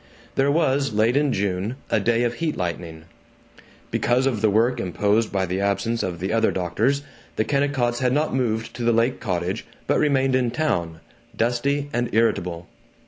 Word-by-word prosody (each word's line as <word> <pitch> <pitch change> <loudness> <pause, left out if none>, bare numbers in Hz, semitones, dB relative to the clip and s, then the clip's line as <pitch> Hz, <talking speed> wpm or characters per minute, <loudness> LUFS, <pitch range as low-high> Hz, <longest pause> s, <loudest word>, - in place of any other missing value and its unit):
There 135 +1 +2
was, 140 -5 +1
late 110 +4 +2
in 145 -1 +2
June, 100 +2 -1 0.2
a - - +3
day 115 +3 +2
of 120 -1 0
heat 160 +1 -2
lightning. 85 -2 -4 0.9
Because 125 +2 +2
of 120 -6 0
the 110 - +4
work 115 +4 +2
imposed 105 +3 +1
by 95 -1 0
the 95 +2 -2
absence 100 +4 0
of 90 -2 -3
the 95 +4 -2
other 115 0 +3
doctors 110 +11 0 0.3
the 110 - 0
Kennicotts 140 -4 0
had 125 -1 +1
not 150 +2 +1
moved 115 -4 -1
to 120 - -4
the 120 0 +3
lake 115 +3 +1
cottage 90 +3 -2 0.2
but 145 - +2
remained 135 -3 +2
in 125 -2 +2
town, 85 - -1 0.3
dusty 125 +6 0
and 120 0 0
irritable. 90 -7 0
115 Hz, 175 wpm, -23 LUFS, 100-130 Hz, 0.9 s, the